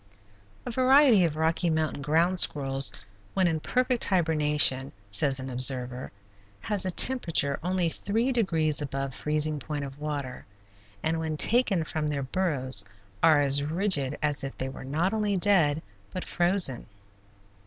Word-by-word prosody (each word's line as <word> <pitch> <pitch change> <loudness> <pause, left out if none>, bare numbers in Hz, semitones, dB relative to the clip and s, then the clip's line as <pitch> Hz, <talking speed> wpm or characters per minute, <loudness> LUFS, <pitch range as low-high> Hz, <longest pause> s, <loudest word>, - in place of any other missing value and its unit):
A - - -5
variety 255 -5 +4
of 155 -3 -3
Rocky 160 +2 0
Mountain 155 -2 -2
ground 165 +5 +1
squirrels, 135 -3 +2 0.4
when 190 -1 +2
in 160 -2 -1
perfect 250 +7 -1
hibernation, 150 -6 +1 0.2
says 135 +7 +2
an 130 - -6
observer, 125 0 +1 0.5
has 205 - -1
a - - 0
temperature 170 - +1
only 180 0 -1
three 220 +9 -2
degrees 165 - -1
above 135 -1 -4
freezing 150 +1 -2
point 145 +1 -5
of 135 +1 -11
water, 145 -4 -6 0.6
and 160 +1 -1
when 160 -1 -4
taken 210 -4 +3
from 155 -1 -4
their 145 -2 -3
burrows 130 - +1 0.4
are 155 -3 +4
as 140 0 +5
rigid 150 -3 -2
as 150 -2 0
if 135 - -7
they 130 - -3
were - - -10
not 160 +9 -1
only 210 -2 -1
dead, 170 -6 +2 0.3
but 185 - -6
frozen. 175 -7 +2
155 Hz, 145 wpm, -26 LUFS, 140-185 Hz, 0.6 s, as